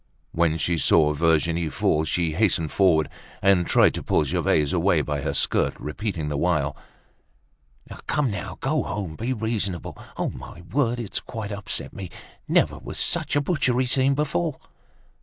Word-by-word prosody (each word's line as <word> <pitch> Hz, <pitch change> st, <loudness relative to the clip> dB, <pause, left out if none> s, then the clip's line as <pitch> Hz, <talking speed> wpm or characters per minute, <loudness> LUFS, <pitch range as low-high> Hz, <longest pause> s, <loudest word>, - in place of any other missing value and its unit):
When 80 Hz, -1 st, +1 dB
she 85 Hz, 0 st, 0 dB
saw 75 Hz, +1 st, +4 dB
Virginie 80 Hz, +1 st, +1 dB
fall 75 Hz, +1 st, +1 dB
she 80 Hz, +2 st, 0 dB
hastened 85 Hz, -4 st, +1 dB
forward, 85 Hz, -6 st, +3 dB, 0.3 s
and 95 Hz, -3 st, +3 dB
tried -, -, +5 dB
to -, -, -4 dB
pull -, -, +2 dB
Gervaise 75 Hz, +1 st, +1 dB
away -, -, +3 dB
by 75 Hz, -1 st, -2 dB
her 70 Hz, 0 st, -2 dB
skirt, -, -, +1 dB
repeating 85 Hz, 0 st, -4 dB
the 75 Hz, -1 st, -2 dB
while, 75 Hz, -5 st, +1 dB, 1.3 s
"Come 140 Hz, -5 st, +1 dB
now, 100 Hz, -, -5 dB
go 150 Hz, +2 st, +1 dB
home! 95 Hz, -7 st, -4 dB
Be 115 Hz, +7 st, -3 dB
reasonable. 105 Hz, -7 st, -2 dB, 0.2 s
On -, -, -2 dB
my 85 Hz, -, -10 dB
word, 125 Hz, -4 st, +1 dB
it's 115 Hz, -5 st, -4 dB
quite 110 Hz, -3 st, -6 dB
upset 100 Hz, -1 st, -5 dB
me. 95 Hz, -2 st, -7 dB, 0.4 s
Never -, -, +2 dB
was -, -, -8 dB
such -, -, -1 dB
a 145 Hz, -, +3 dB
butchery 130 Hz, -5 st, +1 dB
seen 135 Hz, +2 st, +3 dB
before." 140 Hz, -12 st, -1 dB
90 Hz, 160 wpm, -24 LUFS, 80-115 Hz, 1.3 s, tried